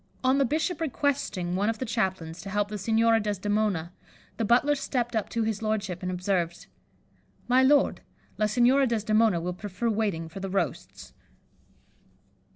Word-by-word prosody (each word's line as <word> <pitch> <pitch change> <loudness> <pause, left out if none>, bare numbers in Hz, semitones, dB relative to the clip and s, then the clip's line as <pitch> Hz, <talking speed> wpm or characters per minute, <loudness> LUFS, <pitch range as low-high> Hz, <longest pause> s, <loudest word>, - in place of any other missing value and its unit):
On 260 +2 +3
the 275 - +4
bishop 320 +6 -1
requesting 265 - -1
one 200 +3 +1
of 225 - -2
the 255 - -3
chaplains 190 -7 -2
to 195 - -8
help 205 +1 0
the 210 -1 -5
Signora 225 +2 +3
Desdemona, 205 -4 -1 0.4
the 230 - -1
butler 245 +7 +3
stepped 245 -4 -2
up 220 - -1
to 230 -1 -1
his 220 -1 -2
lordship, 210 -5 -2
and 185 0 -3
observed, 180 -2 -2 0.8
'My 255 +1 +4
lord, 280 +2 +3 0.4
La 215 - +3
Signora 250 +5 +4
Desdemona 215 -4 +2
will 180 +2 -3
prefer 205 +5 -3
waiting 200 -7 -1
for 160 +4 -9
the 195 0 -4
roasts. 195 +1 -3
215 Hz, 160 wpm, -27 LUFS, 190-240 Hz, 0.8 s, the